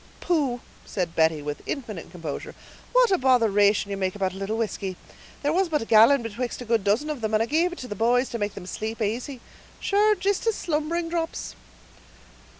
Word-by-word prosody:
"Pooh!" 280 -9 0 0.2
said 175 -4 -3
Betty, 160 -2 +2
with 145 0 -4
infinite 220 - -5
composure, 165 -5 -6 0.4
"what - - +4
a 375 - +3
botheration 210 -5 +3
ye - - -1
make 190 -1 -2
about 190 -2 -1
a - - -9
little 195 +3 -2
whisky; 200 -4 -3 0.5
there 290 +2 +1
was 370 0 +2
but 300 -6 0
a - - -8
gallon 230 +4 +6
betwixt 230 +2 -4
a 245 - -7
good 225 -3 +1
dozen 225 +10 +1
of 285 -5 -5
them, 220 0 0
and 215 - +3
I - - -1
gave 325 +7 +1
it 355 - -8
to 255 - -7
the 205 - -4
boys 245 +5 +2
to 235 - -4
make 205 -1 -2
them 195 - -8
sleep 220 +4 -5
asy; 235 +4 -3 0.4
sure, 420 +1 +3
jist 400 +3 -1
as 450 - +2
slumbering 330 +1 -1
drops." 330 -1 -3
230 Hz, 205 wpm, -25 LUFS, 205-305 Hz, 0.5 s, gallon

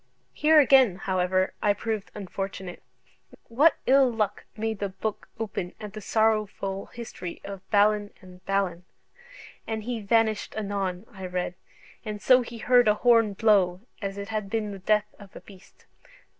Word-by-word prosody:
Here 310 +1 +5
again, 265 -8 +6
however, 185 0 0
I 205 -1 +3
proved 215 0 -4
unfortunate, 195 -2 -6 0.7
what 285 +8 +4
ill 265 -1 +5
luck 215 -3 -2
made 220 -1 -2
the 200 - -2
book 210 +3 -5
open 200 -5 -4
at 210 -2 -8
the 215 - -7
sorrowful 210 -3 0
history 225 -7 -8
of 195 -1 -7
Balin 205 0 +3
and 185 0 -15
Balan? 195 -3 0 0.8
"And 220 -1 -3
he 235 0 -3
vanished 220 +1 +1
anon," 195 -2 -3
I 190 -2 -7
read: 180 0 -3 0.5
"and 210 -2 -5
so 255 +4 +5
he 235 -1 -8
heard 245 +1 +4
an 210 - +5
horne 230 -2 +4
blow, 195 -4 +3 0.2
as 195 -1 -4
it 200 +1 -6
had 215 -2 -3
been 215 -1 -2
the 195 - -8
death 210 +2 +1
of 200 -2 -14
a - - -8
beast. 195 -2 -18
210 Hz, 155 wpm, -26 LUFS, 195-225 Hz, 0.8 s, again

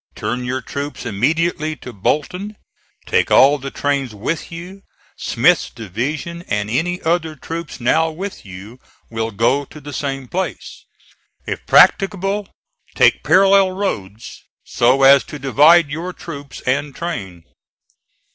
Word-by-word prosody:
Turn 125 0 -3
your 130 +1 -2
troops 140 +1 -6
immediately 155 - 0
to 125 -4 -10
Bolton; 180 - -2 0.5
take - - +1
all 140 +2 +5
the 135 +1 -6
trains 135 -5 -2
with 145 +13 -4
you. 180 +4 -9 0.3
Smith's - - +2
division, 140 - -5
and 105 0 -2
any 175 +8 -1
other 160 -1 0
troops 165 +1 -7
now 160 +7 +2
with 185 +5 -7
you, 100 +6 -11 0.3
will 115 0 -2
go 120 +7 +1
to 150 - -13
the 145 0 -9
same 135 -1 -4
place. 175 - -5 0.6
If - - -5
practicable, 195 +1 +3 0.5
take - - +4
parallel 195 0 +4
roads, 110 - -5 0.2
so 130 +3 +2
as 135 0 +7
to 150 - -8
divide 145 +4 +5
your 170 +5 -4
troops 145 -6 -9
and 140 +2 -1
train." 95 - -6
145 Hz, 130 wpm, -19 LUFS, 125-170 Hz, 0.6 s, as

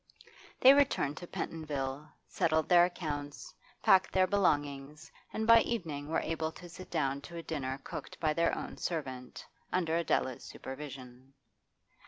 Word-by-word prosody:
They 265 +2 +10
returned 275 - +2
to 175 - -8
Pentonville, 145 -3 -4 0.2
settled 160 -1 +1
their 175 -1 +7
accounts, 145 -5 -5 0.3
packed 185 -1 +5
their 185 -1 +4
belongings, 150 -5 0 0.2
and 220 - -2
by 230 0 +8
evening 155 -11 -3
were 160 - +1
able 160 -1 -2
to 180 - -11
sit 180 +2 -11
down 140 -4 -1
to 170 +3 -9
a 165 - -6
dinner 135 -4 -3
cooked - - -8
by 155 -2 +1
their 170 +1 +2
own - - -6
servant 130 -7 -5 0.3
under 165 -3 +1
Adela's 130 -6 0
supervision. 130 -1 -9
155 Hz, 145 wpm, -32 LUFS, 140-175 Hz, 0.3 s, They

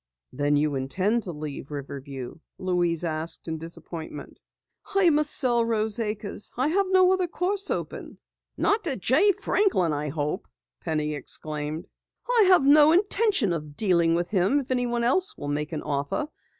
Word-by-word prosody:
"Then 145 +2 +1
you 150 0 +1
intend 185 - 0
to 190 - -5
leave 150 -3 -7
Riverview?" 140 -1 -7 0.2
Louise 175 -2 0
asked 160 0 -3
in 160 -1 -3
disappointment. 165 -2 -8 0.5
"I 375 -4 +5
must 300 0 +2
sell 240 -5 +2
Rose 220 -1 0
Acres. 210 -2 -4
I 260 +4 +2
have 390 +4 +1
no 375 0 +5
other 370 -1 0
course 385 +4 -1
open." - - -5 0.4
"Not 425 +2 +1
to 280 -6 +1
Jay 270 - +4
Franklin, 335 - +1
I 150 +1 -2
hope!" 150 +5 -3 0.3
Penny 155 -2 -2
exclaimed. 150 +3 -4 0.4
"I 475 -4 +4
have 365 -5 +6
no 295 +2 +7
intention 390 - +2
of 150 -3 -6
dealing 170 -5 +3
with 175 +1 -1
him 200 +7 +2
if 260 - -9
anyone 240 -2 0
else 360 +11 +1
will 145 - -5
make 150 +1 -2
an 155 - -4
offer. 145 - -2
185 Hz, 160 wpm, -26 LUFS, -, 0.5 s, no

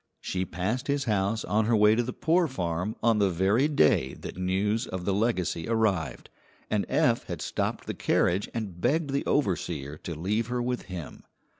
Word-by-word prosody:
She 95 0 -2
passed 95 +9 -2
his 140 -1 +1
house 105 -1 0
on 105 +3 +1
her 115 +1 +3
way 105 0 +6
to 115 - +2
the 120 +1 -3
poor 165 +6 +2
farm 90 - -2
on 115 -2 +4
the 100 -1 +3
very 95 - +2
day 75 - +3
that - - -7
news 100 +6 0
of 95 -1 -5
the 100 - +1
legacy 95 -6 0
arrived, 100 - 0 0.4
and - - +1
Eph - - +2
had - - -4
stopped - - -2
the - - -3
carriage 95 +4 +1
and 100 -7 -5
begged 145 +3 +1
the 140 - 0
overseer 80 - -1
to 85 - -6
leave 105 +8 -1
her 125 0 -2
with 125 0 -2
him. 90 -4 -7
105 Hz, 185 wpm, -28 LUFS, 90-120 Hz, 0.4 s, way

